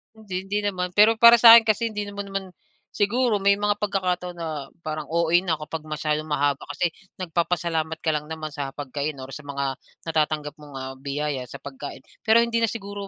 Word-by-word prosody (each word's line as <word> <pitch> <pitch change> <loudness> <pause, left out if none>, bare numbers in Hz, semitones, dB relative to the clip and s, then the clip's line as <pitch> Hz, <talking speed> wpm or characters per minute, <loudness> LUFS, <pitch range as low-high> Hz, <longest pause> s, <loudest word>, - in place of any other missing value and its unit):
Hindi, 190 -4 -5
hindi 205 +2 -1
naman, 180 -2 -2
pero 210 +4 +5
para 235 +1 +8
sa 230 0 +11
akin 235 - +7
kasi 225 +1 +1
hindi 210 -2 -4
naman 200 0 -6
mo 195 - -10
naman 195 -1 -2 0.5
siguro 220 +1 +1
may 200 +1 +4
mga 205 0 0
pagkakataon 180 -3 -1
na 155 -5 -5 0.2
parang 155 0 -4
OA 170 +1 +3
na 175 -3 -1
kapag 155 +1 -7
masyadong 155 0 -2
mahaba 145 -2 +1
kasi 165 +4 -1 0.2
nagpapasalamat 170 -2 -1
ka 160 - +2
lang 150 0 -3
naman 155 -1 -6
sa 140 -2 -5
pagkain 145 +1 -4
or 135 - -9
sa 145 0 -9
mga 140 -2 -3 0.2
natatanggap 155 -2 -1
mong, 145 -2 -12
ah, 130 0 -5
biyaya 140 -2 -3
sa - - -11
pagkain. 140 0 -8 0.2
Pero 230 +1 +6
hindi 230 0 0
na 230 - +2
siguro 200 -2 -6
170 Hz, 195 wpm, -24 LUFS, 150-205 Hz, 0.5 s, sa